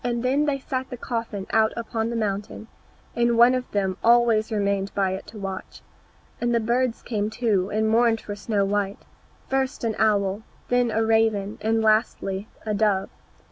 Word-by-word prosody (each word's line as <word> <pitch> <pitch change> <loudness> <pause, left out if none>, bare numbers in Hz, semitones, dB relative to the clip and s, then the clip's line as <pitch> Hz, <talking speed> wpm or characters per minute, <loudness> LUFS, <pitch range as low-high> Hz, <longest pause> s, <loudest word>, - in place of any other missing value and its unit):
Then 250 +4 +1
they 290 -2 0
set 260 -1 -4
the 250 - -6
coffin 230 -5 -4
out 220 0 +3
upon 230 -1 -2
the 235 - -3
mountain, 210 0 -3 0.5
and 235 0 +2
one 240 +2 +7
of 255 -1 -2
them 190 -2 -1
always 230 -1 +4
remained 200 -2 0
by 195 -2 +1
it 190 - -5
to 220 - -11
watch. 195 -2 -7 0.6
And 240 0 +1
the - - +3
birds 240 +2 0
came 210 -3 -2
too, 215 -5 0
and 215 +1 0
mourned 225 0 +3
for 205 - -6
Snow 205 -1 0
white, 200 0 -2 0.4
first 265 -1 -1
an 225 -1 0
owl, 205 -2 +2 0.3
then 245 -1 +2
a 225 0 +1
raven, 220 -2 +1
and 225 +1 +1
lastly, 215 -2 +1 0.2
a 215 - -1
dove. 200 -2 +1
220 Hz, 175 wpm, -24 LUFS, 205-235 Hz, 0.6 s, one